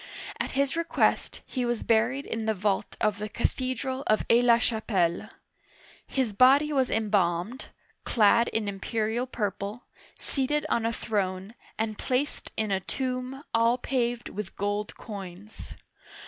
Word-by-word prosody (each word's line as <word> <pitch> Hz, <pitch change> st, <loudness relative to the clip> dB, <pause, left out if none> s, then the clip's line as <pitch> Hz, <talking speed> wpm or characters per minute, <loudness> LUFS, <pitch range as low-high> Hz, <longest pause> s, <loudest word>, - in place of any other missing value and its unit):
At -, -, -2 dB
his 275 Hz, +1 st, +1 dB
request, 335 Hz, 0 st, +1 dB
he 255 Hz, -, -3 dB
was 240 Hz, -1 st, -1 dB
buried 235 Hz, +5 st, +2 dB
in 225 Hz, -1 st, -3 dB
the 220 Hz, -, +2 dB
vault 195 Hz, 0 st, -1 dB
of 210 Hz, -1 st, +1 dB
the 210 Hz, +1 st, -4 dB
cathedral 260 Hz, +3 st, -2 dB
of 215 Hz, -, +2 dB
Aix 235 Hz, +1 st, +6 dB
la 235 Hz, -1 st, +6 dB
Chapelle. 205 Hz, -7 st, 0 dB, 0.8 s
His 255 Hz, -6 st, -1 dB
body 275 Hz, +7 st, +5 dB
was 265 Hz, -2 st, +2 dB
embalmed, 205 Hz, +1 st, 0 dB, 0.4 s
clad 235 Hz, +1 st, +4 dB
in 220 Hz, -2 st, -1 dB
imperial 220 Hz, +4 st, -1 dB
purple, 210 Hz, -1 st, -3 dB, 0.3 s
seated 295 Hz, +2 st, -1 dB
on 230 Hz, -1 st, +1 dB
a -, -, 0 dB
throne, 195 Hz, -3 st, -2 dB, 0.2 s
and 215 Hz, -1 st, -2 dB
placed 265 Hz, +3 st, -1 dB
in 215 Hz, -2 st, 0 dB
a 190 Hz, -, +2 dB
tomb 255 Hz, +5 st, -3 dB
all 230 Hz, +2 st, +4 dB
paved 245 Hz, -2 st, -1 dB
with 205 Hz, -1 st, -6 dB
gold 205 Hz, +1 st, -2 dB
coins. 200 Hz, -1 st, -9 dB
230 Hz, 140 wpm, -28 LUFS, 205-255 Hz, 0.8 s, Aix